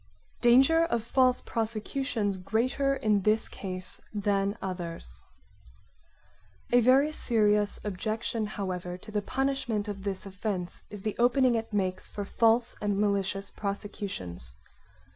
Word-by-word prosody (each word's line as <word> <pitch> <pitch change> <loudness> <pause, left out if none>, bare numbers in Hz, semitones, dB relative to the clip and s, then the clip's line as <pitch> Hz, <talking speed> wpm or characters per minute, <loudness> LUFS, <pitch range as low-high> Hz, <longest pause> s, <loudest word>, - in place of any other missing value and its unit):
Danger 265 +8 +6
of 235 -9 -1
false 255 +1 +3
prosecutions 225 -1 0
greater 255 +8 0
in 215 -5 +2
this 215 +3 +2
case 185 -1 -5
than 200 -1 0
others 170 - -6 1.5
A 245 0 +6
very 265 +5 +5
serious 210 -7 +1
objection, 215 +2 -2
however, 180 -3 -4
to 215 +4 -12
the 210 -1 0
punishment 265 -3 -1
of 200 -2 -5
this 195 0 -4
offence 195 -2 -4
is 205 -2 -8
the 215 - -2
opening 250 +1 +4
it 225 -1 -2
makes 185 -3 -1
for 205 - -5
false 230 +3 +2
and 205 -1 0
malicious 200 -1 0
prosecutions. 195 - -5
210 Hz, 125 wpm, -29 LUFS, 195-235 Hz, 1.5 s, Danger